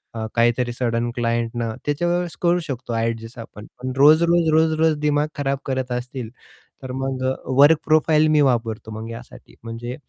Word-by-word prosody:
अ, 110 - -3
काहीतरी 120 +1 +2
sudden 120 -1 -1
client 115 -1 -1
ना 110 -1 -3
त्या 145 +4 -1
वेळेस 175 -1 -1
करू 175 +1 +3
शकतो 125 -2 -5
ॲडजस्ट 115 +1 -3
आपण. 105 -2 -10 0.2
पण 130 0 -3
रोज-रोज, 160 +3 +5
रोज-रोज 160 0 +3
दिमाग 150 0 +1
खराब 140 -1 -1
करत 130 -2 -3
असतील 125 -1 -5 0.5
तर 130 - -6
मग 135 -1 -3
अ, - - -7 0.3
वर्क 150 +2 +7
प्रोफाइल 155 0 +3
मी 150 - +5
वापरतो 115 -2 -3
मग 115 +1 -7
यासाठी 115 - -12
म्हणजे 120 +2 -6
130 Hz, 165 wpm, -21 LUFS, 115-155 Hz, 0.5 s, वर्क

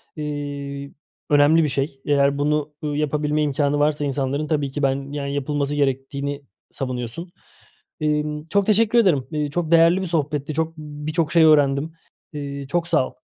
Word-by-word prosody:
eee, 145 -2 -5 0.4
önemli 150 +3 +5
bir 150 - +1
şey, 135 0 -3
eğer 140 -1 +2
bunu, 150 +1 0
ııı, 145 -1 -2
yapabilme 150 0 0
imkânı 145 0 +1
varsa 150 0 +1
insanların 140 +2 -1
tabii 145 -3 0
ki 145 +1 -4
ben, 135 +1 0
yani, 140 -1 -3
yapılması 145 +1 -1
gerektiğini 140 +1 -2 0.3
savunuyorsun. 130 +5 -5 0.7
Emm, 150 0 -1
çok 200 +1 +1
teşekkür 220 +2 +3
ederim. 165 - +3
Eee, 150 -1 -1
çok 165 +1 -2
değerli 170 +2 +5
bir 190 - -2
sohbetti. 150 -2 -1
Çok, 160 +1 -2
ımm, 150 -1 -8
birçok 155 0 0
şey 165 -1 +6
öğrendim. 145 0 +4 0.4
Eee 140 -2 -5
çok 170 +2 -1
sağ 150 -6 +2
ol. - - -18
145 Hz, 165 wpm, -22 LUFS, 140-155 Hz, 0.7 s, şey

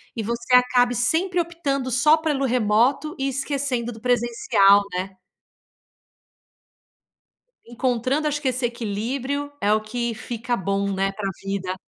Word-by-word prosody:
e 225 - -3
você 235 +3 0
acabe 245 -1 +3
sempre 345 +9 +1
optando 280 -6 -2
só 300 +6 +5
pelo 295 -4 -1
remoto 250 +5 +1
e 270 - 0
esquecendo 265 -3 -2
do 220 -1 -12
presencial, 230 -5 +3
né? 190 +1 -4 2.5
Encontrando 255 +4 -1
acho 295 0 -2
que 270 - -2
esse 255 -1 0
equilíbrio, 245 +5 -3
é 205 +1 +2
o 215 - +3
que 235 +1 -3
fica 235 +1 -3
bom, 200 +1 -1
né, 195 0 0
pra 195 0 -4
vida. 190 -1 -3
245 Hz, 130 wpm, -23 LUFS, 215-275 Hz, 2.5 s, só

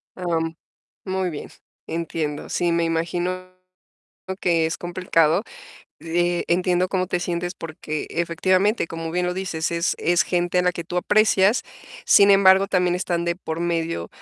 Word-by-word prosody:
Am, 165 -2 -2 0.5
muy 190 -1 -1
bien, 150 -4 -7 0.4
entiendo. 160 -3 -3
Sí, 175 -1 0
me 170 0 +1
imagino 175 +2 -2 0.9
que 165 -2 +2
es 160 - -2
complicado. 175 0 +1 0.6
Eh, 175 +1 0
entiendo 180 +1 +2
cómo 185 -1 0
te 180 -1 -1
sientes 175 +1 -3
porque 155 -1 -5
efectivamente, 185 +4 +1
como 165 0 -5
bien 180 +1 0
lo 180 - -2
dices, 180 -4 -2
es 170 0 0
es 175 +2 +2
gente 175 0 0
a - - +3
la 180 0 +2
que 170 - -5
tú 175 - -5
aprecias. 210 +3 +3 0.4
Sin 200 0 +6
embargo, 195 0 +6
también 180 -2 +1
están 175 -2 -1
de 170 0 -1
por 160 -2 -5
medio, 165 - -2
175 Hz, 150 wpm, -23 LUFS, 165-185 Hz, 0.9 s, Sin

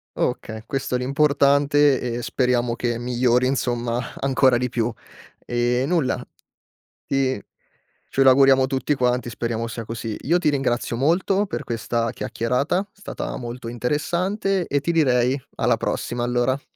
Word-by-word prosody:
Okay, 110 0 -2
questo 135 0 -2
è - - +3
l'importante 140 +1 +3
e 120 -1 -3
speriamo 125 -2 0
che 120 -1 -1
migliori, 125 +1 +1
insomma 120 -2 -1
ancora 130 -2 +3
di 125 +1 -1
più. 120 -1 -1 0.5
Ehm, 120 +2 0
nulla. 165 -7 0 0.8
E 130 -5 0 0.6
ce 135 - +2
lo 135 - +7
auguriamo 135 0 +5
tutti 135 +2 0
quanti, 125 -1 0
speriamo 115 -1 -3
sia 115 0 -6
così. 115 -1 -5
Io 170 +6 +2
ti 170 - -1
ringrazio 125 -4 -1
molto 180 - +2
per - - -5
questa 115 0 -1
chiacchierata, 125 +9 -1
è 205 +1 -14
stata 200 - -5
molto 120 -1 -6
interessante 175 - -1
e 145 - +1
ti 170 +5 -1
direi 130 -4 +3 0.2
alla - - +2
prossima 120 - -3
allora. 125 +3 0
125 Hz, 145 wpm, -23 LUFS, 120-140 Hz, 0.8 s, lo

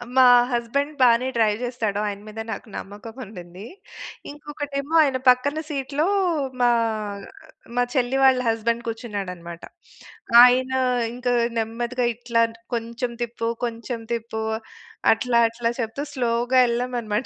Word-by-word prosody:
మా 260 - +7 0.3
హస్బెండ్ 275 +5 -1
బానే 245 +1 +5
డ్రైవ్ 215 -2 +2
జేస్తాడు. 225 -5 -2
ఆయన 200 -1 -4
మీద 220 +1 -8
నాకు 225 - -6
నమ్మకం 205 +3 -9
ఉండింది. 180 -1 -11 0.7
ఇంకొకటేమో 290 0 -5
ఆయన 270 -3 +1
పక్కన 285 +5 +3
సీట్‌లో 285 +3 -1 0.5
మా 245 - +5 1.1
మా 245 - +3
చెల్లి 260 0 +1
వాళ్ళ 260 -1 +5
హస్బెండ్ 230 +1 0
కూర్చున్నాడన్నమాట. 190 -7 -6 0.8
ఆయన 255 +1 +4 0.4
ఇంక 250 0 -6 0.3
నెమ్మదిగా 235 +3 -2
ఇట్లాంట్ 230 -1 0 0.2
కొంచెం 235 +1 -3
తిప్పు, 235 -1 -3 0.2
కొంచెం 230 0 -5
తిప్పు, 225 -1 -4 0.7
అట్లా, 235 +1 +2
అట్లా 230 0 -2
చెప్తూ 230 +5 -3
స్లోగా 245 0 +1
ఎళ్ళామమాట. 235 -2 -2
235 Hz, 115 wpm, -23 LUFS, 225-255 Hz, 1.1 s, మా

